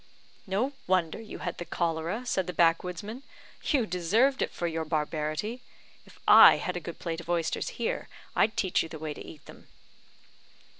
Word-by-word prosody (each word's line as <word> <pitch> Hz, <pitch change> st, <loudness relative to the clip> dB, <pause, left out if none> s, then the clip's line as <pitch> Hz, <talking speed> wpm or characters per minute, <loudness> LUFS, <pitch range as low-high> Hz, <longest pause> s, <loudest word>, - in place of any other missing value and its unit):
"No 220 Hz, +9 st, 0 dB
wonder 180 Hz, 0 st, +1 dB
you 220 Hz, -, -8 dB
had 175 Hz, -, -4 dB
the -, -, -3 dB
cholera," 170 Hz, +7 st, -2 dB
said 190 Hz, -6 st, 0 dB
the 180 Hz, -, -3 dB
backwoodsman, 180 Hz, +8 st, +1 dB, 0.4 s
"you 270 Hz, -7 st, +2 dB
deserved 215 Hz, -, +2 dB
it -, -, +1 dB
for 175 Hz, -, -4 dB
your 165 Hz, -1 st, -1 dB
barbarity. 155 Hz, +8 st, -2 dB, 0.5 s
If -, -, -17 dB
I -, -, +10 dB
had 180 Hz, -, -3 dB
a -, -, -1 dB
good 170 Hz, 0 st, -8 dB
plate 165 Hz, -1 st, -4 dB
of 170 Hz, -, -14 dB
oysters 170 Hz, -2 st, 0 dB
here, 235 Hz, -, -2 dB, 0.3 s
I'd 220 Hz, -, +2 dB
teach 185 Hz, -3 st, +2 dB
you 165 Hz, -, -5 dB
the 160 Hz, -, -7 dB
way 155 Hz, -1 st, -4 dB
to -, -, -9 dB
eat 150 Hz, -, -12 dB
them." -, -, -14 dB
175 Hz, 180 wpm, -28 LUFS, 165-215 Hz, 0.5 s, I